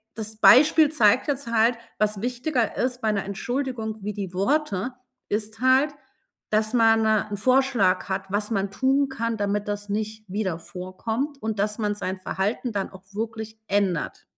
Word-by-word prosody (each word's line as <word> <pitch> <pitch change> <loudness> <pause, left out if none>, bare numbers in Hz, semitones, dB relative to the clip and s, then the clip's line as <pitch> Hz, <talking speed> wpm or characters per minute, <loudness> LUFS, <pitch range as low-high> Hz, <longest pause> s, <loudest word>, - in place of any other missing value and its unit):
das 220 -1 -6
Beispiel 300 +5 +7
zeigt 240 -2 +4
jetzt 275 -4 -2
halt: 230 +1 +3 0.2
Was 210 -1 +1
wichtiger 250 +1 -1
ist 250 0 -1
bei 220 - +1
'ner 200 -2 -1
Entschuldigung 225 +1 -3
wie 210 +1 -3
die 190 -3 -5
Worte, 245 +1 0 0.4
ist 215 +1 -2
halt, 265 +3 +4 0.6
dass 215 +1 +1
man 225 -2 +4
'n 215 -1 +1
Vorschlag 240 -7 +2
hat, 190 0 -2
was 205 +1 -1
man 195 -2 -1
tun 270 +4 +2
kann, 230 -3 -2
damit 205 0 -1
das 205 0 -4
nicht 215 +1 -3
wieder 190 -4 -2
vorkommt 220 - -4
und, 220 -2 -3
dass 210 +2 0
man 210 -1 0
sein 190 -2 -3
Verhalten 210 +6 -2
dann 200 -2 -2
auch 190 -1 -13
wirklich 220 0 -5
ändert. 195 -5 -1
220 Hz, 165 wpm, -25 LUFS, 205-245 Hz, 0.6 s, Beispiel